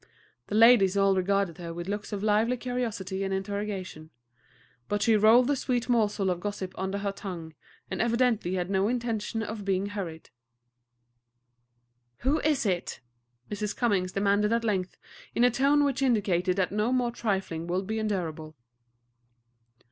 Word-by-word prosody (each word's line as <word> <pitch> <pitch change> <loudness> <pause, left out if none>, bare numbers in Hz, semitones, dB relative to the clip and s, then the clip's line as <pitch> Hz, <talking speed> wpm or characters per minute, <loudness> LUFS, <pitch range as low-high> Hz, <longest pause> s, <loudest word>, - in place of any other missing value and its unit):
The - - -3
ladies 215 -4 +6
all 195 -1 +4
regarded 190 -2 0
her 170 -1 -6
with 175 +1 -6
looks 205 +2 -4
of 205 -1 -4
lively 220 +4 +2
curiosity 225 -7 -3
and 195 - -2
interrogation; 195 -4 -4 0.8
but 205 0 0
she 225 - +4
rolled 220 +4 +6
the 285 +2 +1
sweet 245 -2 -1
morsel 210 -5 +2
of 175 - -2
gossip 195 -1 -5
under 190 +1 -3
her 200 0 -2
tongue, 175 -5 -7 0.4
and - - -1
evidently 235 -5 +1
had 180 -1 -1
no 195 +1 +2
intention 225 -2 -2
of 215 -1 -5
being 195 0 0
hurried. 180 -6 -6 1.9
"Who 280 +5 +2
is 295 -5 +1
it?" 180 -8 -2 0.5
Mrs. 210 0 -3
Cummings 195 -6 +1
demanded 205 +1 +2
at 230 0 +1
length, 190 -5 -1 0.4
in 235 - +3
a 245 - +5
tone 280 +4 +3
which 275 -2 0
indicated 195 -8 +1
that 185 -2 0
no 210 +4 0
more 250 -2 +1
trifling 190 -8 -2
would 185 +2 -1
be 220 +2 -2
endurable. 165 -7 -3
205 Hz, 155 wpm, -28 LUFS, 190-230 Hz, 1.9 s, ladies